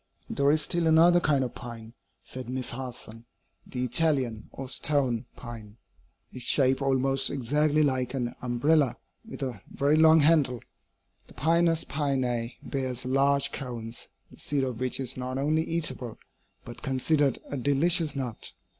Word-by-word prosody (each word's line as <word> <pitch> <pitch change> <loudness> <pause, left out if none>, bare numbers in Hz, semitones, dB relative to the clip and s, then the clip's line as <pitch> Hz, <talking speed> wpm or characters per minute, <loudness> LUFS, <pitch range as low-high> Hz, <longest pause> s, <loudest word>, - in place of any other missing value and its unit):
"There 140 0 +2
is 155 +1 +3
still 170 +2 0
another 170 +2 +6
kind 145 -5 +2
of 125 - -4
pine," 115 -2 -9 0.3
said 130 -1 -7
Miss 130 0 -1
Harson 120 -2 -7 0.4
"the 125 -1 -4
Italian, 125 -4 0
or 135 - -7
stone, 130 -2 0
pine. 115 -3 -10 0.5
It - - -11
is - - -7
shaped 130 +2 +2
almost 135 0 +1
exactly 150 +3 +1
like 130 -2 0
an 120 -2 -2
umbrella 130 +3 +2 0.3
with 225 -10 -8
a 130 -3 -5
very 145 +2 +1
long 160 0 +6
handle. 145 -6 +3 0.6
The - - -17
Pinus 165 +1 +2
pinea 130 -5 -1
bears 130 -2 -3
large 140 +2 +2
cones, 120 -3 -5 0.2
the - - -16
seed 145 -2 0
of 125 -3 -3
which 130 0 +1
is 130 -1 -2
not 130 +1 -4
only 150 +3 +1
eatable, 140 -8 -2 0.5
but 120 - -10
considered 135 +2 +1
a - - -2
delicious 145 +4 +3
nut. 125 -5 -4
135 Hz, 150 wpm, -27 LUFS, 125-150 Hz, 0.6 s, another